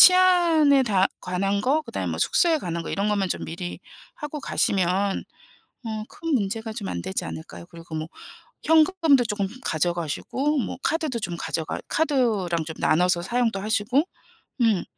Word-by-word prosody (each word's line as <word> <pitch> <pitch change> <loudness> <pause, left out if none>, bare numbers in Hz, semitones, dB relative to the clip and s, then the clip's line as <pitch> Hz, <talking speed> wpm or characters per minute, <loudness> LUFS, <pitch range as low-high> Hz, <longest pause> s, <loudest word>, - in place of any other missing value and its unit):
치안에 340 -7 +6
다 195 -4 +3
관한 195 +2 -1
거, 285 +7 +2
그다음에 - - -4
뭐 - - -4
숙소에 330 -3 +3
관한 170 - -4
거 - - -6
이런 200 +2 0
것만 200 -3 +1
좀 - - -2
미리 175 +2 -6 0.3
하고 300 -6 -6
가시면 195 -1 +1 0.6
어 215 -1 -3
큰 330 -2 -4
문제가 220 0 -1
좀 210 -4 -5
안 85 - -3
되지 95 - -2
않을까요? 85 +1 -8
그리고 165 -1 -9
뭐 155 0 -3 0.6
현금도 320 -4 +4
쪼끔 205 -3 -1 0.2
가져가시고, 175 - -1
뭐 - - -3
카드도 310 -7 -1
좀 175 -4 -4
가져가 160 -2 -3
카드랑 220 - +1
좀 160 - -6
나눠서 175 +2 +3
사용도 235 -2 0
하시고 220 +7 +1 0.6
음 220 -6 +3
210 Hz, 315 characters per minute, -24 LUFS, 175-285 Hz, 0.6 s, 치안에